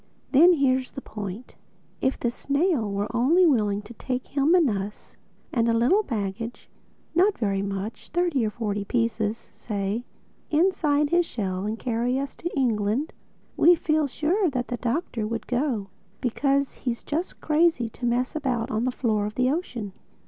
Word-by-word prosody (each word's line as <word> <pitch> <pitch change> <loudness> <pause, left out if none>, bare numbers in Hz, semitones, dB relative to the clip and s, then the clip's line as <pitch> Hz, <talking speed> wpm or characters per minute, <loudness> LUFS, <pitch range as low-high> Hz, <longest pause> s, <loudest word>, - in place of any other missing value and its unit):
Then 335 +6 +7
here's 260 -4 +2
the 270 - -6
point: 210 0 -7 0.5
if 265 - 0
this 240 -1 -1
snail 280 - 0
were 205 +4 -2
only 315 +10 +5
willing 210 -9 +2
to 230 - -11
take 250 +2 -4
him 285 +5 +3
and 340 -5 +5
us—and 210 +3 -4
a - - +3
little 255 - +4
baggage—not 235 - -2
very 200 -4 0
much, 200 +2 -5
thirty 345 -6 +1
or 215 - +1
forty 210 -2 -3
pieces, 225 -1 -1
say—inside 290 - -1
his 345 -1 +3
shell 190 -3 -3
and 220 +1 -2
carry 240 +2 0
us 275 0 -3
to 345 - -3
England, 235 +2 +1 0.4
we 350 +1 +6
feel 310 -2 +1
sure 335 - +1
that 250 -3 -3
the 245 - -2
Doctor 240 -3 -2
would 225 0 -4
go; 245 -6 -1 0.3
because 275 +2 +1
he's 240 -2 -4
just 325 +5 -3
crazy 310 -5 +2
to 245 - -16
mess 245 +3 0
about 255 -5 -1
on 225 +1 0
the 255 - +1
floor 215 -5 0
of 210 - -7
the 255 +1 +2
ocean. 245 - -3
245 Hz, 155 wpm, -25 LUFS, 215-295 Hz, 0.5 s, Then